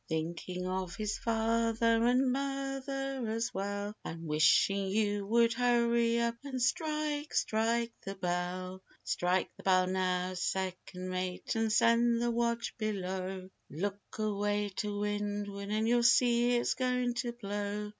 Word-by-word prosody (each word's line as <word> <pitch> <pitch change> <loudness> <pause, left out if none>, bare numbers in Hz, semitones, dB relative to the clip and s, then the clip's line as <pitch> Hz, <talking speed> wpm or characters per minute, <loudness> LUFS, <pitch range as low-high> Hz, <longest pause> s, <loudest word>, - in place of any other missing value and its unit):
Thinking 170 +3 -3
of 185 -1 -3
his 215 -1 -2
father, 230 0 +2
and 250 +2 +3
mother 270 0 -3
as 225 +1 -2
well, 200 +1 -3
And 165 0 -6
wishing 160 +6 +3
you 205 0 0
would 230 +1 +4
hurry 235 -1 +2
up, 235 0 0
and 270 -2 -4
strike, 300 +2 -1
strike 230 +2 +1
the 195 0 -5
bell! 180 +1 -3
Refrain: - - -30
Strike 180 +1 0
the - - -11
bell 185 -1 +4
now, 185 0 0
second 185 0 -3
mate, 185 0 -3
and 225 -1 +1
send 235 +1 +4
the 240 0 +1
watch 235 0 -1
below, 190 -3 -3 0.2
Look 200 +7 -3 0.2
away 205 -1 0
to 205 -1 -2
windward 205 -1 -3
and 215 +1 0
you'll 240 +1 +4
see 240 0 +4
it's 240 - +1
going 250 -1 0
to 240 -1 -2
blow. 205 -2 -4
215 Hz, 140 wpm, -32 LUFS, 190-235 Hz, 0.2 s, would